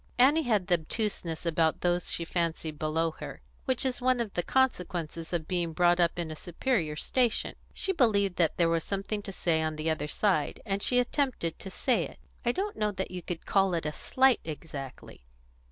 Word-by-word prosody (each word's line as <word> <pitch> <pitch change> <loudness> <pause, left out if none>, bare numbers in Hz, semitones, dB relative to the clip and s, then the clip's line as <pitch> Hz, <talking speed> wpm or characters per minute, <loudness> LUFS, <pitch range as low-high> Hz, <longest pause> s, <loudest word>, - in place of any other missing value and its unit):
Annie 280 +6 +6
had 215 - +1
the 175 -2 +3
obtuseness 170 -2 -3
about 160 -1 +2
those 175 -1 +1
she 170 - 0
fancied 165 -3 -2
below 160 +1 +1
her - - -7 0.3
which 260 -1 +1
is 255 -1 -1
one 255 0 +3
of 225 -4 -2
the 175 - +1
consequences 175 -9 0
of 165 -3 -2
being 175 -2 -1
brought 175 +1 +4
up 170 0 +2
in 170 -2 -3
a - - -5
superior 175 - -1
station. 240 +8 +1 0.2
She 385 - 0
believed 200 - +2
that 170 -3 +2
there 170 - +4
was 165 -1 +1
something 200 +1 -2
to 200 - -6
say 165 -3 +1
on 155 0 -1
the 155 +1 -1
other 155 -1 -2
side, 180 -3 +1
and 200 -2 -1
she 250 - +2
attempted 250 - 0
to 190 - -7
say 245 +6 +1
it. - - -15 0.3
"I 240 - +3
don't 400 +9 -3
know 210 -1 +1
that 190 -2 -4
you 180 -1 -5
could 175 -1 -5
call 195 -2 +3
it 165 - -2
a 150 - 0
slight 265 - +3
exactly. 145 - -8
180 Hz, 200 wpm, -29 LUFS, 165-225 Hz, 0.3 s, Annie